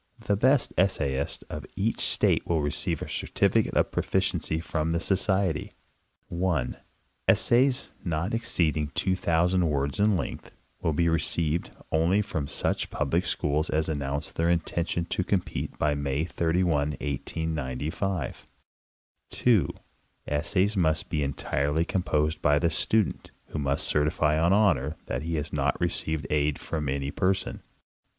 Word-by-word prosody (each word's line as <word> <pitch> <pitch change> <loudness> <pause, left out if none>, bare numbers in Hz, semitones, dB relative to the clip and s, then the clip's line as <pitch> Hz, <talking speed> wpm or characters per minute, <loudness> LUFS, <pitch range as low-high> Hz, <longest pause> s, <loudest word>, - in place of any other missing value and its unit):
The 100 - 0
best 130 +6 +3
essayist 70 -8 0
of 75 - -6
each 105 +4 0
state - - +2
will 80 -3 +1
receive 75 - -1
a - - -4
certifi - - +1
cate - - -6
of - - +2
proficiency 95 -4 0
from 80 -1 -1
the 85 - +1
Society. 95 -3 +1 0.6
1. 85 -7 0 0.5
Essays, 130 +2 +3
not 85 +4 -1
exceeding 80 -9 +1
2,000 90 -1 +2
words 70 +1 -1
in 105 -1 +4
length, - - -5 0.3
will 80 - +1
be 85 +3 +2
re 80 0 +3
ceived 85 +1 -1 0.2
only 85 +6 +3
from 80 -8 -3
such 70 - -1
public - - 0
schools 75 +2 0
as 80 0 +1
announce 70 -1 -2
their 80 - 0
inten 85 0 0
tion 85 - -1
to 90 - -1
compete 90 -1 -2
by 75 0 +2
May 70 +1 -1
31, 85 +1 +1 0.3
1895. 75 +4 -3 0.8
2. 115 -7 +3 0.6
Essays 90 +8 +1
must 80 -5 +1
be 75 - -1
entirely 70 +3 0
composed 75 -4 0
by 75 0 +4
the 85 +2 +1
student, 105 +6 +1 0.2
who 75 - -4
must 70 -1 0
certify 75 +1 +2
on 85 +2 +3
honor 85 -8 +3
that 65 - -3
he 80 +1 -2
has 75 -2 -3
not - - 0
received 80 -2 -1
aid 75 -1 +1
from 75 -4 -3
any 70 +1 -2
person. 95 +3 -1
80 Hz, 145 wpm, -27 LUFS, 75-90 Hz, 0.8 s, in